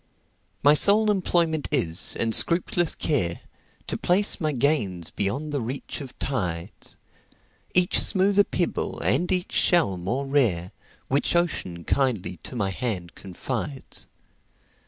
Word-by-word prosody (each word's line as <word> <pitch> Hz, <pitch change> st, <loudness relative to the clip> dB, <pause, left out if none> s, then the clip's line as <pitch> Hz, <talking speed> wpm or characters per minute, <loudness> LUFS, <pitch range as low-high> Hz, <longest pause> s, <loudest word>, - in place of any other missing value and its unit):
My 145 Hz, +1 st, +7 dB
sole 210 Hz, +7 st, +5 dB
employment 170 Hz, -5 st, 0 dB
is, 90 Hz, -, 0 dB
and 115 Hz, -1 st, +1 dB
scrupulous 175 Hz, -, +3 dB
care, 90 Hz, -, -1 dB, 0.4 s
To -, -, -3 dB
place 195 Hz, +2 st, +1 dB
my 155 Hz, -1 st, +1 dB
gains 120 Hz, -, 0 dB
beyond 135 Hz, +10 st, -2 dB
the 140 Hz, -, -1 dB
reach 130 Hz, +6 st, -5 dB
of 135 Hz, -3 st, -10 dB
tides,—Each 110 Hz, -, -3 dB
smoother 200 Hz, 0 st, +3 dB
pebble, 175 Hz, -3 st, -2 dB
and 180 Hz, +2 st, +1 dB
each 180 Hz, -1 st, +1 dB
shell 165 Hz, -, +2 dB
more 120 Hz, +11 st, -2 dB
rare, 115 Hz, -11 st, +1 dB, 0.4 s
Which 140 Hz, +5 st, 0 dB
Ocean 95 Hz, -, -1 dB
kindly 110 Hz, -, -1 dB
to -, -, -8 dB
my 100 Hz, -5 st, -1 dB
hand 95 Hz, -5 st, -4 dB
confides. 130 Hz, +8 st, -5 dB
135 Hz, 120 wpm, -25 LUFS, -, 0.4 s, My